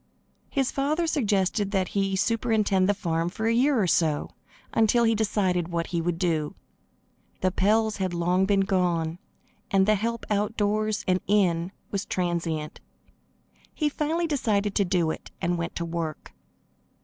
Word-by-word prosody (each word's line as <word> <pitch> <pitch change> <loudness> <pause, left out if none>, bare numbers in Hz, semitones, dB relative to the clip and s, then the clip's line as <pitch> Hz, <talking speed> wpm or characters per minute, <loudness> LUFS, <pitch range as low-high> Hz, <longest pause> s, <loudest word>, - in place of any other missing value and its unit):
His 270 -3 0
father 300 +5 0
suggested 205 - +1
that 190 -3 0
he 195 -1 0
superintend 215 -3 +1
the 205 - +3
farm 170 -4 -1
for 220 +4 -4
a 225 - +3
year 260 +2 +3
or 200 - +3
so, 160 -4 +1 0.4
until 225 +2 +3
he 225 0 +4
decided 195 -5 0
what 170 -1 -2
he 170 - +1
would 170 0 -1
do. 160 -4 -1 0.9
The 185 - +2
Pells 215 +3 +2
had 190 -2 -1
long 180 +2 +1
been 200 -1 +3
gone, 175 -4 0 0.5
and 195 -1 +3
the 215 - +4
help 230 +3 -2
outdoors 210 0 0
and 185 0 +3
in 180 -3 +2 0.2
was 200 -1 -3
transient. 170 -4 -2 1.0
He 300 -2 +1
finally 315 +4 -1
decided 210 -10 0
to 200 - +2
do 175 -3 +1
it, - - -8
and 175 +1 0
went 165 0 -4
to 170 - -2
work. 165 -2 -5
195 Hz, 155 wpm, -26 LUFS, 175-220 Hz, 1.0 s, he